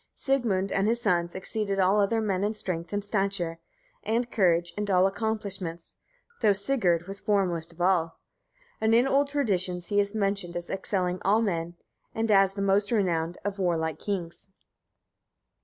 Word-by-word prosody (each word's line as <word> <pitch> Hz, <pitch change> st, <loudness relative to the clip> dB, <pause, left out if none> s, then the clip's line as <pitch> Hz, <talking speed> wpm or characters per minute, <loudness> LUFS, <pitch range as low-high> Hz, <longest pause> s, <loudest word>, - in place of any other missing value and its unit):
Sigmund 220 Hz, -9 st, 0 dB
and 195 Hz, +1 st, +1 dB
his 235 Hz, +2 st, +1 dB
sons 175 Hz, -6 st, 0 dB
exceeded 200 Hz, +1 st, -2 dB
all 195 Hz, +2 st, +3 dB
other 225 Hz, +3 st, +1 dB
men 195 Hz, -3 st, -1 dB
in 210 Hz, +2 st, 0 dB
strength, 175 Hz, -5 st, -4 dB
and 205 Hz, 0 st, -2 dB
stature, 195 Hz, -5 st, -1 dB, 0.4 s
and 235 Hz, +2 st, -1 dB
courage, 175 Hz, -4 st, +2 dB
and 205 Hz, 0 st, -3 dB
all 185 Hz, -1 st, +4 dB
accomplishments, 195 Hz, -5 st, -3 dB, 0.5 s
though 215 Hz, -3 st, +5 dB
Sigurd 195 Hz, -6 st, +1 dB
was 195 Hz, 0 st, -4 dB
foremost 180 Hz, -6 st, 0 dB
of 170 Hz, +1 st, -11 dB
all; 175 Hz, -3 st, +1 dB, 0.6 s
and 220 Hz, +1 st, +3 dB
in 245 Hz, +3 st, +4 dB
old 280 Hz, +1 st, +3 dB
traditions 185 Hz, -11 st, -1 dB
he 205 Hz, -, +2 dB
is 200 Hz, +1 st, 0 dB
mentioned 195 Hz, -4 st, -1 dB
as 175 Hz, 0 st, -6 dB
excelling 185 Hz, -2 st, -1 dB
all 210 Hz, +4 st, +3 dB
men, 170 Hz, -4 st, -2 dB, 0.4 s
and 225 Hz, 0 st, 0 dB
as 195 Hz, -1 st, +4 dB
the 200 Hz, -, -2 dB
most 200 Hz, +2 st, +2 dB
renowned 175 Hz, -6 st, 0 dB
of 200 Hz, 0 st, -3 dB
warlike 160 Hz, -4 st, 0 dB
kings. 190 Hz, -1 st, -5 dB
195 Hz, 160 wpm, -27 LUFS, 175-210 Hz, 0.6 s, though